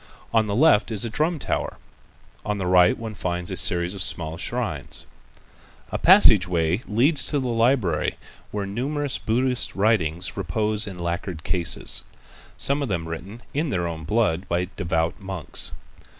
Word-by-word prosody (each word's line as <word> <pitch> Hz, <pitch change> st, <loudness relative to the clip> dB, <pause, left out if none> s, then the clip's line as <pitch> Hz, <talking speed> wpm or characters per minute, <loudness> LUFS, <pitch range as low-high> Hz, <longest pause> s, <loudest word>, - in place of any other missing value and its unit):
On 110 Hz, -1 st, +3 dB
the 100 Hz, -, -1 dB
left 120 Hz, -5 st, +4 dB
is 110 Hz, -1 st, +1 dB
a 115 Hz, -, -4 dB
drum 155 Hz, +7 st, 0 dB
tower. -, -, -3 dB, 0.7 s
On 105 Hz, 0 st, -2 dB
the 95 Hz, -, -3 dB
right 90 Hz, 0 st, +5 dB
one 110 Hz, -1 st, -6 dB
finds 90 Hz, -3 st, -3 dB
a -, -, -2 dB
series 85 Hz, +1 st, +2 dB
of 100 Hz, -, -6 dB
small 80 Hz, -2 st, 0 dB
shrines. -, -, -3 dB, 0.9 s
A -, -, -2 dB
passage 140 Hz, -, +7 dB
way 85 Hz, +3 st, 0 dB
leads 135 Hz, +8 st, +2 dB
to 150 Hz, -, 0 dB
the 130 Hz, -3 st, -1 dB
library 115 Hz, -, +1 dB, 0.3 s
where 105 Hz, -1 st, -3 dB
numerous 140 Hz, +7 st, -2 dB
Buddhist 125 Hz, +2 st, +1 dB
writings 95 Hz, -5 st, +1 dB
repose 105 Hz, +4 st, 0 dB
in 95 Hz, -3 st, -7 dB
lacquered 85 Hz, -1 st, -4 dB
cases, 90 Hz, -3 st, 0 dB, 0.6 s
some 140 Hz, +2 st, +1 dB
of 140 Hz, -, -2 dB
them 85 Hz, -4 st, -2 dB
written 95 Hz, +8 st, -8 dB
in 150 Hz, +2 st, -1 dB
their 90 Hz, -8 st, -1 dB
own 80 Hz, -1 st, -6 dB
blood 90 Hz, -1 st, 0 dB
by 90 Hz, +1 st, 0 dB
devout 85 Hz, -2 st, -1 dB
monks. 95 Hz, -6 st, -3 dB
100 Hz, 160 wpm, -24 LUFS, 85-115 Hz, 0.9 s, passage